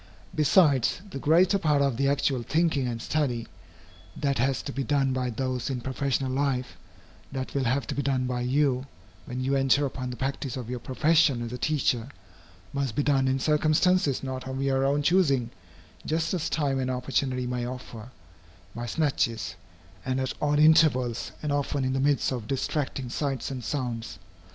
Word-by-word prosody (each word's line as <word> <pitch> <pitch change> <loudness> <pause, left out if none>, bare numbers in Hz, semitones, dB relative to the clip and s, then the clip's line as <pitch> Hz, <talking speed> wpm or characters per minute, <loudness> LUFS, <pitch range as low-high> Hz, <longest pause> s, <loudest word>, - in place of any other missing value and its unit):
Besides, 150 - +4
the 135 - -5
greater 175 +7 +4
part 150 -5 +2
of 140 -3 +2
the 140 +3 +1
actual 140 -2 +1
thinking 155 0 +1
and 120 -1 -3
study, 120 -4 -1 0.7
that 140 -4 0
has 135 +2 +1
to 140 - -5
be 135 0 -2
done 135 0 +1
by 130 -1 -1
those 125 +1 -2
in 130 -2 -2
professional 130 +1 -1
life, 130 -2 -1 0.6
that 130 -1 -4
will 135 -2 0
have 130 +1 +1
to - - -3
be 140 - -1
done 130 -2 0
by 125 -1 -2
you, 130 +1 +1 0.4
when 125 +1 -4
you 135 +2 0
enter 135 +1 +3
upon 130 -2 -4
the 125 - -5
practice 135 0 -3
of 125 -1 -6
your 125 - -3
profession 145 0 +2
as 120 0 -5
a - - -3
teacher, 130 -5 0 0.6
must 140 -5 -2
be 145 - +1
done 135 -2 +2
in 130 0 +2
circumstances 155 +1 +2
not 130 -1 -5
of 130 0 -4
your 135 0 +1
own 145 +1 +1
choosing, 140 -8 +2 0.5
just 160 +3 -1
as 175 -4 -1
time 140 -4 0
and 130 -1 -1
opportunity 125 0 -1
may 125 0 -2
offer, 125 -2 -8 0.6
by 120 +1 -5
snatches, 120 -6 0 0.5
and 130 0 -1
at 130 -1 -1
odd 145 0 +2
intervals, 150 -6 +4
and 150 - -1
often 145 -1 0
in 130 - 0
the 135 - 0
midst 140 0 +2
of 120 -5 -4
distracting 135 0 -2
sights 135 +1 -2
and 130 -2 -5
sounds. 120 -5 -3
135 Hz, 180 wpm, -27 LUFS, 125-145 Hz, 0.7 s, Besides